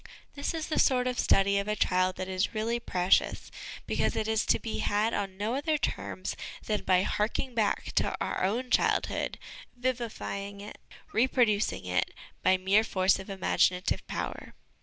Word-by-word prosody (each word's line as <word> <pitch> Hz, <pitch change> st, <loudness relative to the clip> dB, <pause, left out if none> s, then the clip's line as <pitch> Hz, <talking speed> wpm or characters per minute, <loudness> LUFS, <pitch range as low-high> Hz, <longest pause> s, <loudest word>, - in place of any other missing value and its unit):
This 285 Hz, +3 st, -3 dB
is 320 Hz, -1 st, -2 dB
the 310 Hz, -, -1 dB
sort 250 Hz, -2 st, +3 dB
of 250 Hz, -1 st, -1 dB
study 200 Hz, +1 st, +3 dB
of 200 Hz, -, -3 dB
a 210 Hz, -, 0 dB
child 185 Hz, -2 st, +2 dB
that 185 Hz, -, -4 dB
is 190 Hz, +3 st, -1 dB
really 230 Hz, +2 st, 0 dB
precious, 180 Hz, -4 st, +1 dB, 0.3 s
because -, -, 0 dB
it 220 Hz, -, -1 dB
is 220 Hz, -1 st, +1 dB
to -, -, +4 dB
be 225 Hz, -, -4 dB
had 210 Hz, +3 st, +1 dB
on 195 Hz, -2 st, -3 dB
no 210 Hz, +4 st, -1 dB
other 300 Hz, +3 st, +1 dB
terms 190 Hz, -7 st, -3 dB, 0.3 s
than 210 Hz, -2 st, 0 dB
by 185 Hz, 0 st, +4 dB
harking 225 Hz, +6 st, -1 dB
back 220 Hz, -3 st, 0 dB
to -, -, +2 dB
our -, -, -2 dB
own 240 Hz, +7 st, -1 dB
childhood, -, -, +1 dB, 0.4 s
vivifying 230 Hz, -5 st, -3 dB
it, 205 Hz, +1 st, -9 dB, 0.3 s
reproducing 225 Hz, -, +2 dB
it, 90 Hz, 0 st, -1 dB, 0.3 s
by 185 Hz, 0 st, +4 dB
mere 195 Hz, +4 st, +3 dB
force 190 Hz, -3 st, +2 dB
of 190 Hz, -, -9 dB
imaginative 185 Hz, -1 st, +1 dB
power. -, -, -5 dB
210 Hz, 165 wpm, -29 LUFS, 190-235 Hz, 0.4 s, to